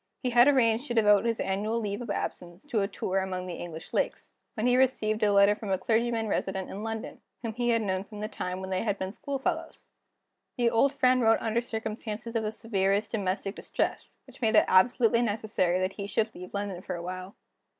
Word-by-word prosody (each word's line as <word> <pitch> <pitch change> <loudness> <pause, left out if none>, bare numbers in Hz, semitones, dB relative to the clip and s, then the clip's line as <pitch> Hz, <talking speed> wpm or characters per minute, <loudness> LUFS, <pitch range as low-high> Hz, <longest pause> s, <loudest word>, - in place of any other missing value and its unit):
He 250 - 0
had 240 +2 +6
arranged 250 -2 +3
to 240 - -3
devote 210 -1 +5
his 230 -1 0
annual 210 +4 -1
leave 205 0 -3
of 240 - -7
absence 175 -1 -4
to 235 -8 0
a 195 - +1
tour 195 -2 -2
among 185 -1 -3
the 180 - -5
English 165 -1 -8
Lakes, - - -2 0.2
when 220 - -1
he 250 0 +4
received 225 -4 +2
a 210 -1 +4
letter 200 +1 +5
from 210 -1 -7
a 190 - +2
clergyman 225 +3 0
resident 190 -2 -2
in 200 +2 -6
London, 225 0 -5 0.2
whom 225 -1 -3
he 240 +2 -1
had 230 -1 +2
known 190 -2 -1
from 210 +1 -11
the 210 - -2
time 185 -3 -4
when 190 0 -6
they 185 - 0
had 205 -3 -1
been 190 +1 -4
school 280 +3 -4
fellows. 330 +4 -4 0.7
This 240 -1 +3
old 260 +5 +3
friend 255 -2 +3
wrote 225 -1 +5
under 230 +1 0
circumstances 220 0 -5
of 225 - +2
the 215 -1 -2
severest 205 -2 0
domestic 195 -2 -2
distress, - - -3
which - - -17
made 220 -1 +2
it - - +6
absolutely 230 +4 +4
necessary 205 -5 0
that 185 +1 -1
he 200 0 -5
should 220 +1 0
leave 180 +1 -9
London 200 -3 -4
for - - -5
a 170 - -6
while. 185 +2 -6
215 Hz, 220 wpm, -28 LUFS, 195-230 Hz, 0.7 s, had